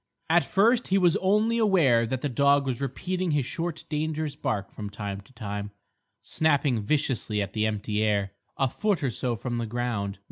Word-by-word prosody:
At -, -, +5 dB
first 230 Hz, +5 st, +3 dB
he 195 Hz, -, +3 dB
was 175 Hz, -3 st, +4 dB
only 210 Hz, +5 st, +2 dB
aware 150 Hz, -, +4 dB
that 130 Hz, +2 st, -2 dB
the -, -, 0 dB
dog 140 Hz, +2 st, +3 dB
was 130 Hz, -1 st, -2 dB
repeating 180 Hz, +7 st, -2 dB
his 145 Hz, -4 st, +1 dB
short 165 Hz, +2 st, -4 dB
dangerous 155 Hz, -1 st, -2 dB
bark 100 Hz, -8 st, -2 dB
from 105 Hz, -1 st, -6 dB
time 100 Hz, -1 st, -5 dB
to 100 Hz, -, -22 dB
time, 105 Hz, -3 st, -5 dB, 0.5 s
snapping 145 Hz, -6 st, +1 dB
viciously 120 Hz, -3 st, 0 dB
at 100 Hz, 0 st, -3 dB
the 110 Hz, 0 st, +1 dB
empty 105 Hz, 0 st, -2 dB
air, 100 Hz, -2 st, +1 dB, 0.3 s
a 135 Hz, -, +2 dB
foot 200 Hz, -, -1 dB
or 130 Hz, -, +1 dB
so 120 Hz, +1 st, -2 dB
from 120 Hz, +3 st, -3 dB
the 115 Hz, -, -2 dB
ground. 110 Hz, -4 st, -2 dB
130 Hz, 185 wpm, -27 LUFS, 105-160 Hz, 0.5 s, At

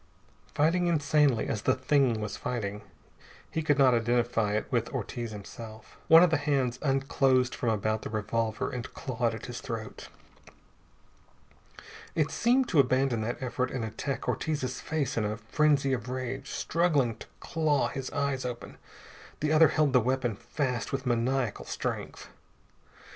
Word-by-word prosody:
Fighting 170 Hz, +4 st, +2 dB
insanely 150 Hz, -6 st, +2 dB
as 105 Hz, -, -2 dB
the 130 Hz, -, +2 dB
Thing 130 Hz, -3 st, +2 dB
was 105 Hz, -1 st, -4 dB
fighting, 105 Hz, -5 st, -4 dB, 0.7 s
he 160 Hz, -, -1 dB
could 150 Hz, -2 st, +2 dB
not 135 Hz, -3 st, +5 dB
identify 120 Hz, -2 st, +1 dB
it 105 Hz, -, -1 dB
with -, -, 0 dB
Ortiz 120 Hz, -1 st, -4 dB
himself. 110 Hz, +1 st, -10 dB
One 165 Hz, +2 st, +9 dB
of 180 Hz, -, +4 dB
the 160 Hz, -, +3 dB
hands 135 Hz, -4 st, 0 dB
unclosed 135 Hz, -2 st, +2 dB
from 120 Hz, -, -1 dB
about 110 Hz, 0 st, 0 dB
the -, -, -6 dB
revolver 110 Hz, +1 st, -2 dB
and 125 Hz, -2 st, -5 dB
clawed 120 Hz, -3 st, -1 dB
at 110 Hz, -, -8 dB
his 120 Hz, 0 st, -6 dB
throat. 115 Hz, -3 st, -6 dB, 2.1 s
It 155 Hz, -2 st, +1 dB
seemed 250 Hz, +2 st, +2 dB
to 160 Hz, -, +3 dB
abandon 130 Hz, -3 st, +2 dB
that 120 Hz, +4 st, -3 dB
effort 125 Hz, 0 st, -1 dB
and 125 Hz, -4 st, -3 dB
attacked 110 Hz, +5 st, -4 dB
Ortiz's 140 Hz, -5 st, -2 dB
face 155 Hz, -6 st, -2 dB
in 110 Hz, -, +1 dB
a 105 Hz, 0 st, -2 dB
frenzy 140 Hz, +4 st, +2 dB
of 125 Hz, -1 st, -3 dB
rage, 130 Hz, +1 st, -4 dB
struggling 150 Hz, -9 st, +1 dB
to -, -, -10 dB
claw 155 Hz, -3 st, +1 dB
his 135 Hz, -1 st, -5 dB
eyes 140 Hz, -2 st, -1 dB
open. 125 Hz, -1 st, -6 dB, 0.6 s
The 150 Hz, 0 st, 0 dB
other 160 Hz, +1 st, +7 dB
held 150 Hz, -2 st, +1 dB
the 125 Hz, -, +5 dB
weapon 125 Hz, -2 st, 0 dB
fast 125 Hz, +2 st, -3 dB
with 135 Hz, 0 st, -3 dB
maniacal 125 Hz, 0 st, 0 dB
strength. -, -, -4 dB
130 Hz, 155 wpm, -29 LUFS, 115-145 Hz, 2.1 s, One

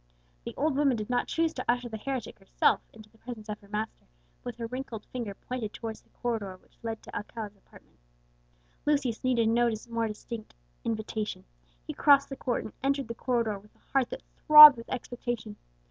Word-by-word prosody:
The -, -, -6 dB
old 295 Hz, 0 st, +1 dB
woman 275 Hz, -4 st, +3 dB
did 215 Hz, +3 st, -4 dB
not 245 Hz, -, +1 dB
choose 325 Hz, 0 st, 0 dB
to 255 Hz, -, -5 dB
usher 245 Hz, 0 st, +1 dB
the 225 Hz, -, -6 dB
heretic 260 Hz, -1 st, -4 dB
herself 195 Hz, -, +2 dB
into 215 Hz, -1 st, -14 dB
the 225 Hz, -, -25 dB
presence 225 Hz, -3 st, -9 dB
of 210 Hz, -, -4 dB
her 200 Hz, -, -18 dB
master, 210 Hz, +2 st, -5 dB, 0.3 s
but -, -, -36 dB
with -, -, -5 dB
her 230 Hz, -, -5 dB
wrinkled 245 Hz, -2 st, -6 dB
finger 230 Hz, -6 st, -5 dB
pointed 235 Hz, -3 st, -5 dB
towards 225 Hz, -2 st, -6 dB
the -, -, -33 dB
corridor 215 Hz, -6 st, -3 dB
which -, -, -30 dB
led 225 Hz, -1 st, -5 dB
to -, -, -11 dB
Alcala's 210 Hz, -1 st, -6 dB
apartment. 195 Hz, -, -21 dB, 0.8 s
Lucius 280 Hz, -6 st, 0 dB
needed 240 Hz, -3 st, +2 dB
no 235 Hz, +1 st, +3 dB, 0.2 s
more 230 Hz, -1 st, 0 dB
distinct 220 Hz, +1 st, -8 dB, 0.3 s
invitation. 220 Hz, -1 st, -3 dB, 0.4 s
He -, -, -5 dB
crossed 280 Hz, -1 st, +5 dB
the 270 Hz, -, -5 dB
court, 250 Hz, -2 st, -2 dB
and 215 Hz, -, -9 dB
entered 275 Hz, -2 st, 0 dB
the -, -, -2 dB
corridor 230 Hz, -4 st, -1 dB
with 210 Hz, +2 st, -22 dB
a -, -, -29 dB
heart 270 Hz, -3 st, +3 dB
that -, -, -7 dB
throbbed 300 Hz, -1 st, +11 dB
with 230 Hz, 0 st, -11 dB
expectation. 240 Hz, -3 st, -4 dB
235 Hz, 195 wpm, -29 LUFS, 215-255 Hz, 0.8 s, throbbed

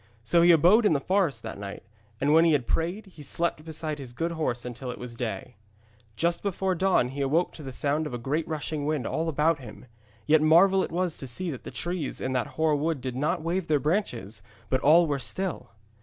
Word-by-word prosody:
So 170 Hz, +10 st, +3 dB
he 170 Hz, -, +6 dB
abode 180 Hz, +8 st, +6 dB
in 170 Hz, -, +3 dB
the 145 Hz, -, +2 dB
forest 165 Hz, -, 0 dB
that 110 Hz, -3 st, -6 dB
night, 100 Hz, -1 st, -7 dB, 0.4 s
and 145 Hz, +2 st, +2 dB
when 165 Hz, +1 st, +7 dB
he 165 Hz, -2 st, +4 dB
had 135 Hz, -5 st, +1 dB
prayed 175 Hz, -, -1 dB
he 185 Hz, -6 st, -14 dB
slept 155 Hz, +2 st, -1 dB
beside 155 Hz, -1 st, -5 dB
his 130 Hz, -3 st, -8 dB
good 165 Hz, +6 st, -2 dB
horse 150 Hz, -8 st, -2 dB
until 125 Hz, +1 st, -6 dB
it 125 Hz, -, -5 dB
was 125 Hz, -1 st, -7 dB
day. 110 Hz, -5 st, -5 dB, 0.6 s
Just 170 Hz, 0 st, 0 dB
before 190 Hz, -1 st, -1 dB
the 170 Hz, -, -6 dB
dawn 185 Hz, -10 st, +3 dB
he 140 Hz, +2 st, -5 dB
awoke 155 Hz, +6 st, +1 dB
to -, -, -11 dB
the 135 Hz, -2 st, -7 dB
sound 145 Hz, +4 st, 0 dB
of 130 Hz, -, -8 dB
a -, -, -2 dB
great 140 Hz, +7 st, -2 dB
rushing 150 Hz, -1 st, -3 dB
wind 150 Hz, -6 st, -1 dB
all 160 Hz, +1 st, -1 dB
about 155 Hz, +1 st, +2 dB
him. 120 Hz, -1 st, -11 dB, 0.4 s
Yet 155 Hz, 0 st, +4 dB
marvel 185 Hz, +5 st, +5 dB
it -, -, -5 dB
was 175 Hz, -1 st, -1 dB
to 135 Hz, -, -6 dB
see 170 Hz, +8 st, -3 dB
that 130 Hz, -, -8 dB
the -, -, -5 dB
trees 175 Hz, -5 st, -4 dB
in 130 Hz, -, -2 dB
that 125 Hz, -2 st, 0 dB
hoar 160 Hz, -1 st, +3 dB
wood 155 Hz, +1 st, -1 dB
did 130 Hz, -1 st, -5 dB
not 150 Hz, +3 st, -1 dB
wave 170 Hz, +1 st, -1 dB
their 150 Hz, -, +3 dB
branches, 125 Hz, -, -2 dB, 0.3 s
but 130 Hz, -1 st, +2 dB
all 165 Hz, +4 st, +6 dB
were 145 Hz, -3 st, -1 dB
still. 180 Hz, -, -3 dB
155 Hz, 230 wpm, -27 LUFS, 130-170 Hz, 0.6 s, when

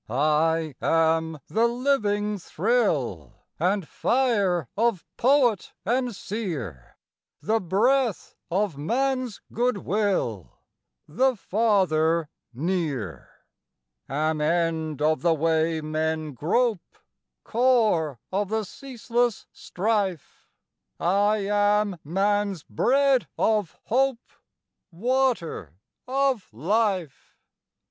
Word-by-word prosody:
I 155 Hz, +4 st, +1 dB
am 160 Hz, 0 st, +2 dB
the 230 Hz, +2 st, +2 dB
living 210 Hz, -5 st, 0 dB
thrill 165 Hz, -, -1 dB
And 185 Hz, +1 st, 0 dB
fire 205 Hz, -, +1 dB
of 225 Hz, -4 st, +1 dB
poet 250 Hz, -5 st, +2 dB
and 245 Hz, +1 st, 0 dB
seer, 150 Hz, -, -6 dB, 0.5 s
The 225 Hz, +2 st, +2 dB
breath 225 Hz, +5 st, +1 dB, 0.2 s
of 185 Hz, -4 st, -1 dB
man's 255 Hz, -, -1 dB
goodwill, 200 Hz, -, -1 dB, 0.5 s
The 255 Hz, -, +2 dB
Father 175 Hz, -7 st, +1 dB, 0.2 s
near; 135 Hz, -, -3 dB, 0.8 s
Am 155 Hz, +2 st, 0 dB
end 160 Hz, -2 st, 0 dB
of 155 Hz, +1 st, +2 dB
the 170 Hz, -1 st, +3 dB
way 160 Hz, +1 st, +1 dB
men 155 Hz, 0 st, -2 dB
grope, 200 Hz, -, -1 dB, 0.5 s
Core 220 Hz, -, +2 dB
of 195 Hz, +1 st, -1 dB
the 220 Hz, 0 st, 0 dB
ceaseless 240 Hz, 0 st, -2 dB
strife, 195 Hz, -4 st, -2 dB, 0.5 s
I 205 Hz, +3 st, +2 dB
am 205 Hz, -2 st, +2 dB
man's 200 Hz, +2 st, 0 dB
bread 265 Hz, -, +2 dB
of 210 Hz, -6 st, +1 dB
hope, 260 Hz, +1 st, 0 dB, 0.6 s
Water 220 Hz, -, -1 dB, 0.3 s
of 265 Hz, -5 st, 0 dB
life. 180 Hz, -, -1 dB
195 Hz, 85 wpm, -25 LUFS, 160-230 Hz, 0.8 s, the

